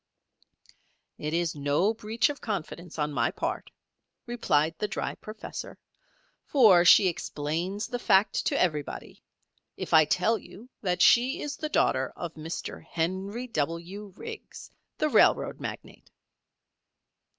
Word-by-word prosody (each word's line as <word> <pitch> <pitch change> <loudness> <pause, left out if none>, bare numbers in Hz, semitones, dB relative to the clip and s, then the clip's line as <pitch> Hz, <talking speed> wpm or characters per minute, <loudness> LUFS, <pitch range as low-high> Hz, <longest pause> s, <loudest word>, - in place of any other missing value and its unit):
"It 150 - -3
is 170 0 0
no 145 +8 +1
breach 225 +4 0
of 290 - -6
confidence 175 -5 -5
on 150 -1 -1
my - - +1
part," - - -4 0.6
replied 165 -10 +1
the 210 - 0
dry 195 - -3
professor, 215 +1 -8 0.7
"for 210 -11 +6
she 185 +2 +7
explains 170 +5 -3
the 245 - -4
fact 200 -3 +3
to - - +1
everybody, 150 -5 -2 0.6
if - - -5
I 155 -1 +8
tell 210 +8 +1
you 190 +7 -14
that 180 -3 +1
she 250 +3 +5
is 295 -1 -4
the 310 - -4
daughter 130 - +1
of 170 -2 -6
Mr. 160 +2 -6
Henry 190 +8 -3
W. 175 - -4
Riggs, 455 - -9 0.3
the 305 - +1
railroad - - +3
magnate." - - -8
185 Hz, 130 wpm, -28 LUFS, 160-225 Hz, 0.7 s, I